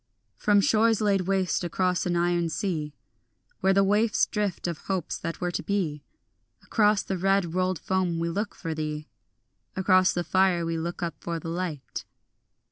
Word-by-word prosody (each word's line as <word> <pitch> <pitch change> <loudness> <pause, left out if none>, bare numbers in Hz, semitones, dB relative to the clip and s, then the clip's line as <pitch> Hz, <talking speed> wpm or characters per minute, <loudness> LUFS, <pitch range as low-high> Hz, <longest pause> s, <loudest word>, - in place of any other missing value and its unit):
From 205 -1 +3
shores 225 +2 +3
laid 200 -4 +1
waste 190 -2 +1
across 180 +1 0
an 175 - 0
iron 175 -1 +1
sea 155 -4 -3 0.6
Where 190 - +3
the 195 +1 +4
waifs 210 +3 +3
drift 205 -4 -2
of 170 -3 -2
hopes 190 -4 -3
that 165 0 -5
were 180 -1 -1
to - - -2
be, 165 -8 -2 0.6
Across 210 -2 +3
the 190 -2 -3
red 195 -2 +2
rolled 185 0 +1
foam 185 0 -1
we 165 0 -1
look 205 +5 -3
for 165 -3 -4
thee, 150 -1 -4 0.7
Across 185 -1 +4
the 175 - -1
fire 185 -1 +2
we 165 0 -1
look 170 +2 -4
up 170 - -2
for 170 -1 -3
the 165 - -6
light. 160 -9 -4
180 Hz, 170 wpm, -27 LUFS, 170-195 Hz, 0.7 s, the